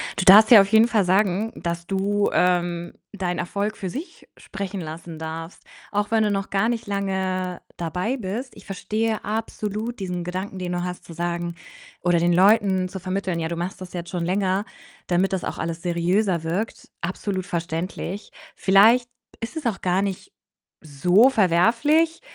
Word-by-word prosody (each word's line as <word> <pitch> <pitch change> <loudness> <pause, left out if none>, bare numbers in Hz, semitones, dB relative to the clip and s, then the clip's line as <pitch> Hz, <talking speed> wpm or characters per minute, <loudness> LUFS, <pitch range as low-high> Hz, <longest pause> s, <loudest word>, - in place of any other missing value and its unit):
Du 190 - -1
darfst 210 +3 +9
dir 225 -5 +10
auf 195 - +1
jeden 220 +2 +5
Fall 215 -4 +2
sagen, 195 +3 +1
dass 170 0 -4
du, 200 +1 +1
ähm, 175 -1 +1 0.2
deinen 180 -3 -3
Erfolg 205 +4 -2
für 190 - -5
sich 325 - -8
sprechen 200 0 -6
lassen 160 0 -8
darfst, 165 +2 -7 0.3
auch 205 0 0
wenn 225 -1 +3
du 210 - +1
noch 195 -1 -2
gar 200 +4 +1
nicht 230 -3 -3
lange 190 -2 -2 0.2
dabei 180 +8 -2
bist. 230 +5 -5
Ich - - -14
verstehe 215 +3 -2
absolut 215 +1 -3
diesen 180 -2 -3
Gedanken, 185 +2 -5
den 180 -1 -4
du 175 0 -2
hast, 180 0 -5
zu 165 - -11
sagen 170 0 -3 0.5
oder 175 -1 +3
den 175 +1 +2
Leuten 190 0 +4
zu 190 +1 -7
vermitteln, 185 -1 -2
ja, 160 0 -2
du 170 - -3
machst 180 +2 -4
das 185 - -8
jetzt 175 -1 -5
schon 175 -2 -2
länger, 190 +2 +1 0.4
damit 185 +2 +1
das 185 - -1
auch - - -4
alles 165 0 -4
seriöser 175 +1 +1
wirkt. 180 +8 -3
Absolut 185 +1 -3
verständlich. 175 +3 -4 0.2
Vielleicht 225 +6 +5 0.3
ist 230 +8 -5
es 310 - -5
auch 215 -6 -1
gar 185 +1 +1
nicht 200 - -4 0.5
so 175 - +4
verwerflich, 240 - +3
190 Hz, 170 wpm, -23 LUFS, 175-210 Hz, 0.5 s, dir